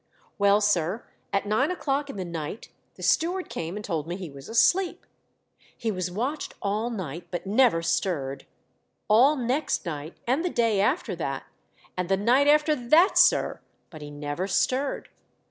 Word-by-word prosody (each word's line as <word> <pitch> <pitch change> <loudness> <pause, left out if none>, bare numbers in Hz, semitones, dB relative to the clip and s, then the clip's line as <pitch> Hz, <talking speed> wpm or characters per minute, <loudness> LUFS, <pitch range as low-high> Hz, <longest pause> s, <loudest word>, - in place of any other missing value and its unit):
Well, 200 +1 +4
sir, 200 +1 +1 0.3
at 200 0 0
nine 215 +8 +1
o'clock 285 -5 -2
in - - -7
the 190 -2 -4
night 165 +3 -6 0.3
the - - -11
steward 360 +3 +1
came 165 +3 -5
and 210 0 -6
told 165 -5 -3
me 175 - -3
he 180 -5 -7
was 140 +4 -11
asleep. 350 +11 +2 0.7
He 225 - -2
was 185 -3 -3
watched 250 +11 -3
all 210 +4 -1
night, 175 - -6
but 175 - -5
never 210 -4 +3
stirred; 140 -6 -2 0.6
all 250 +8 +5
next 260 +3 -1
night, 155 -1 -6
and 265 +7 +1
the 360 - 0
day 230 -8 +1
after 260 - 0
that, - - -3 0.5
and 180 -1 -3
the 195 - +3
night 245 +8 +3
after 300 +1 +4
that, 310 - +4
sir, - - +4 0.3
but 155 -3 -10
he 145 - -8
never 145 +5 -4
stirred. 260 +8 0
205 Hz, 165 wpm, -26 LUFS, 175-265 Hz, 0.7 s, all